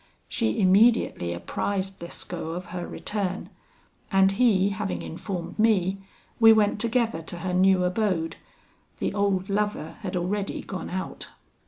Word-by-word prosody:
She 110 Hz, -, -1 dB
immediately 195 Hz, -, +4 dB
apprised 190 Hz, -, -3 dB
Lescaut 170 Hz, -1 st, -6 dB
of 180 Hz, -, -6 dB
her 175 Hz, -1 st, -4 dB
return, 195 Hz, -3 st, -3 dB, 0.6 s
and 195 Hz, -1 st, +5 dB
he 200 Hz, -3 st, +3 dB
having 200 Hz, -1 st, -3 dB
informed 175 Hz, +1 st, -6 dB
me, 195 Hz, -4 st, +3 dB, 0.4 s
we 225 Hz, -1 st, +9 dB
went 210 Hz, -1 st, +3 dB
together 230 Hz, -6 st, 0 dB
to 170 Hz, +2 st, -7 dB
her 180 Hz, +1 st, -3 dB
new 185 Hz, 0 st, +4 dB
abode. 180 Hz, -4 st, 0 dB, 0.6 s
The -, -, -2 dB
old 200 Hz, -2 st, +1 dB
lover 205 Hz, -5 st, -2 dB
had 185 Hz, -3 st, -4 dB
already 195 Hz, +3 st, -2 dB
gone 185 Hz, -, -6 dB
out. 185 Hz, +1 st, -5 dB
195 Hz, 135 wpm, -26 LUFS, 180-210 Hz, 0.6 s, we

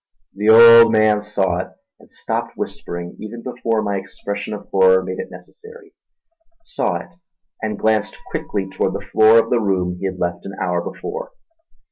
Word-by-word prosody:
The 105 Hz, +2 st, -1 dB
old 115 Hz, 0 st, +9 dB
man 110 Hz, -1 st, +3 dB
saw 95 Hz, -4 st, -1 dB
it, 90 Hz, -, -4 dB, 0.3 s
and -, -, -21 dB
stopped -, -, -4 dB
whispering 85 Hz, 0 st, -6 dB
even 115 Hz, +2 st, -8 dB
before 115 Hz, -3 st, -2 dB
my 100 Hz, -1 st, -2 dB
expression 100 Hz, +2 st, -6 dB
of 105 Hz, -1 st, -7 dB
horror 95 Hz, -1 st, +4 dB
made 95 Hz, 0 st, -6 dB
it -, -, -6 dB
necessary; 445 Hz, -3 st, -14 dB, 0.7 s
saw -, -, -2 dB
it -, -, -8 dB, 0.5 s
and 110 Hz, -1 st, -3 dB
glanced 110 Hz, 0 st, 0 dB
quickly 95 Hz, -2 st, -3 dB
toward 95 Hz, 0 st, -2 dB
the -, -, -6 dB
floor 110 Hz, +1 st, +6 dB
of 115 Hz, 0 st, +2 dB
the 120 Hz, -, +3 dB
room 90 Hz, -4 st, -1 dB
he 95 Hz, -, -2 dB
had 95 Hz, -1 st, -5 dB
left 85 Hz, -1 st, -3 dB
an 100 Hz, -, -8 dB
hour 90 Hz, -1 st, -1 dB
before. 480 Hz, -, -7 dB
105 Hz, 170 wpm, -19 LUFS, 95-115 Hz, 0.7 s, old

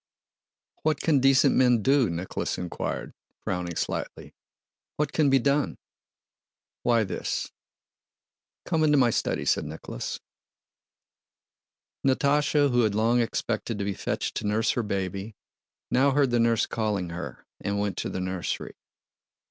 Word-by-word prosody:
"What 155 Hz, -2 st, +1 dB
can 150 Hz, -4 st, +3 dB
decent 135 Hz, 0 st, +5 dB
men 125 Hz, -4 st, +4 dB
do?" 135 Hz, -3 st, +4 dB
Nicholas 85 Hz, +2 st, -3 dB
inquired, 90 Hz, -1 st, -4 dB, 0.3 s
frowning 90 Hz, -2 st, -3 dB
slightly. -, -, -4 dB, 0.6 s
"What 150 Hz, -1 st, -1 dB
can 150 Hz, -3 st, +3 dB
be 135 Hz, -, +5 dB
done?" 140 Hz, +3 st, +1 dB, 1.0 s
"Why, 115 Hz, -2 st, +3 dB
this..." 95 Hz, -, -3 dB, 1.1 s
"Come 160 Hz, -2 st, +1 dB
into 150 Hz, -1 st, +4 dB
my 125 Hz, -3 st, +4 dB
study," -, -, -1 dB
said -, -, +2 dB
Nicholas. -, -, -6 dB, 1.8 s
Natásha, 145 Hz, +1 st, +3 dB
who 120 Hz, 0 st, +3 dB
had 110 Hz, -3 st, +1 dB
long 115 Hz, +3 st, +3 dB
expected 115 Hz, -1 st, -2 dB
to 100 Hz, -, -2 dB
be 100 Hz, -, -1 dB
fetched -, -, -3 dB
to -, -, -2 dB
nurse 110 Hz, +2 st, +2 dB
her 120 Hz, -, 0 dB
baby, 100 Hz, 0 st, -3 dB, 0.6 s
now 135 Hz, +3 st, +4 dB
heard 140 Hz, -2 st, +2 dB
the 120 Hz, -, +2 dB
nurse 115 Hz, -1 st, +3 dB
calling 105 Hz, -5 st, -2 dB
her 75 Hz, -7 st, -7 dB
and 100 Hz, 0 st, -2 dB
went 100 Hz, -2 st, -1 dB
to -, -, -2 dB
the -, -, -4 dB
nursery. 95 Hz, -1 st, -3 dB
115 Hz, 135 wpm, -27 LUFS, 100-135 Hz, 1.8 s, decent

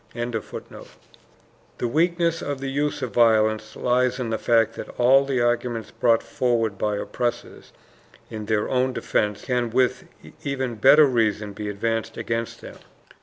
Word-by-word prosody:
] -, -, -27 dB
The 120 Hz, +1 st, -8 dB
weakness 170 Hz, +4 st, +1 dB
of 145 Hz, -1 st, -4 dB
the 135 Hz, 0 st, -4 dB
use 145 Hz, 0 st, -1 dB
of 125 Hz, -, -4 dB
violence 110 Hz, -2 st, +2 dB
lies 125 Hz, 0 st, +1 dB
in 120 Hz, -3 st, -3 dB
the 110 Hz, -, -1 dB
fact 115 Hz, -2 st, +2 dB
that -, -, -8 dB
all 135 Hz, +3 st, +5 dB
the 135 Hz, -3 st, 0 dB
arguments 120 Hz, -1 st, -1 dB
brought 115 Hz, -1 st, +2 dB
forward 115 Hz, -4 st, 0 dB
by 105 Hz, -1 st, 0 dB
oppressors 120 Hz, +4 st, -4 dB, 0.6 s
in 110 Hz, -1 st, -7 dB
their 110 Hz, -1 st, 0 dB
own 130 Hz, 0 st, 0 dB
defense 105 Hz, -3 st, -1 dB
can 125 Hz, -2 st, 0 dB
with 125 Hz, +2 st, +1 dB, 0.4 s
even 130 Hz, -3 st, -2 dB
better 145 Hz, +7 st, +7 dB
reason 110 Hz, -5 st, 0 dB
be 105 Hz, +1 st, -5 dB
advanced 115 Hz, +2 st, -2 dB
against 115 Hz, 0 st, -3 dB
them. -, -, -11 dB
120 Hz, 150 wpm, -23 LUFS, 110-130 Hz, 0.6 s, better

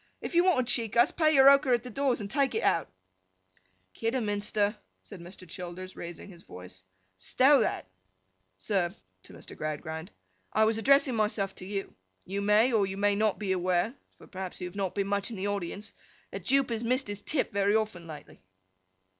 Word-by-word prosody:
'If -, -, -6 dB
you 345 Hz, +1 st, +5 dB
want 315 Hz, -10 st, +2 dB
to 245 Hz, -, +4 dB
cheek 230 Hz, -2 st, -1 dB
us, 240 Hz, +4 st, +5 dB
pay 310 Hz, -2 st, +2 dB
your 270 Hz, 0 st, +7 dB
ochre 275 Hz, -2 st, +6 dB
at 240 Hz, -1 st, +1 dB
the 250 Hz, -, -8 dB
doors 270 Hz, +1 st, 0 dB
and 200 Hz, -, -4 dB
take 275 Hz, -3 st, +1 dB
it -, -, -1 dB
out.' 165 Hz, -, +1 dB, 1.0 s
'Kidderminster,' 210 Hz, -2 st, -1 dB, 0.3 s
said 200 Hz, -5 st, -11 dB
Mr. 180 Hz, +1 st, -12 dB
Childers, 180 Hz, +2 st, -8 dB
raising 170 Hz, +2 st, -8 dB
his 175 Hz, -4 st, -14 dB
voice, 90 Hz, -, -11 dB, 0.4 s
'stow 270 Hz, -, +4 dB
that!—Sir,' 95 Hz, -, -4 dB, 0.3 s
to -, -, -14 dB
Mr. -, -, -11 dB
Gradgrind, 160 Hz, +3 st, -5 dB, 0.4 s
'I 220 Hz, -, +4 dB
was 220 Hz, 0 st, +1 dB
addressing 275 Hz, +2 st, +4 dB
myself 210 Hz, -3 st, 0 dB
to -, -, -10 dB
you. 195 Hz, -1 st, -4 dB, 0.3 s
You 195 Hz, +2 st, -3 dB
may 210 Hz, +5 st, +3 dB
or 205 Hz, -3 st, +3 dB
you 190 Hz, 0 st, -6 dB
may 205 Hz, 0 st, +2 dB
not 215 Hz, 0 st, +1 dB
be 200 Hz, -3 st, -3 dB
aware 180 Hz, +3 st, +1 dB, 0.2 s
(for -, -, -15 dB
perhaps 185 Hz, -1 st, -7 dB
you 180 Hz, -, -4 dB
have 180 Hz, -, -12 dB
not 195 Hz, -3 st, -2 dB
been 200 Hz, -, 0 dB
much 200 Hz, +1 st, -1 dB
in 225 Hz, -, -7 dB
the 190 Hz, -, -3 dB
audience), 200 Hz, +1 st, -4 dB, 0.4 s
that 195 Hz, -3 st, -7 dB
Jupe 270 Hz, 0 st, +2 dB
has 225 Hz, 0 st, -2 dB
missed 255 Hz, +2 st, +1 dB
his 205 Hz, 0 st, -5 dB
tip 285 Hz, +5 st, -1 dB
very 200 Hz, +1 st, +2 dB
often, 210 Hz, -6 st, -2 dB
lately. 155 Hz, -2 st, -11 dB
205 Hz, 190 wpm, -29 LUFS, 180-235 Hz, 1.0 s, your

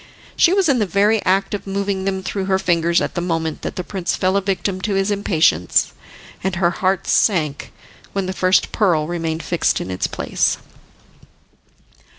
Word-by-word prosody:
She 340 Hz, -, +4 dB
was 385 Hz, -2 st, +3 dB
in 270 Hz, -4 st, +3 dB
the 210 Hz, -, +1 dB
very 205 Hz, +4 st, +2 dB
act 195 Hz, +2 st, +1 dB
of 205 Hz, -, -5 dB
moving 195 Hz, -1 st, -2 dB
them 190 Hz, -1 st, -2 dB
through 195 Hz, 0 st, -3 dB
her 190 Hz, 0 st, +2 dB
fingers 170 Hz, -2 st, +1 dB
at -, -, -2 dB
the 175 Hz, -, -2 dB
moment 165 Hz, -3 st, -2 dB
that -, -, -5 dB
the 180 Hz, -, -3 dB
prince 185 Hz, -1 st, -3 dB
fell 185 Hz, +1 st, 0 dB
a 200 Hz, -, +2 dB
victim 190 Hz, -1 st, -2 dB
to 200 Hz, 0 st, -1 dB
his 195 Hz, +1 st, +1 dB
impatience, 160 Hz, -, +2 dB, 0.5 s
and 190 Hz, -1 st, -1 dB
her 175 Hz, -1 st, +2 dB
heart 190 Hz, +2 st, 0 dB
sank 155 Hz, -9 st, +1 dB, 0.4 s
when 195 Hz, -1 st, -2 dB
the 185 Hz, -, -3 dB
first 185 Hz, 0 st, +2 dB
pearl 175 Hz, -8 st, +2 dB
remained 165 Hz, -1 st, -3 dB
fixed 170 Hz, -, 0 dB
in 95 Hz, -, -5 dB
its 90 Hz, -, -1 dB
place. -, -, 0 dB
190 Hz, 180 wpm, -20 LUFS, 170-200 Hz, 0.5 s, She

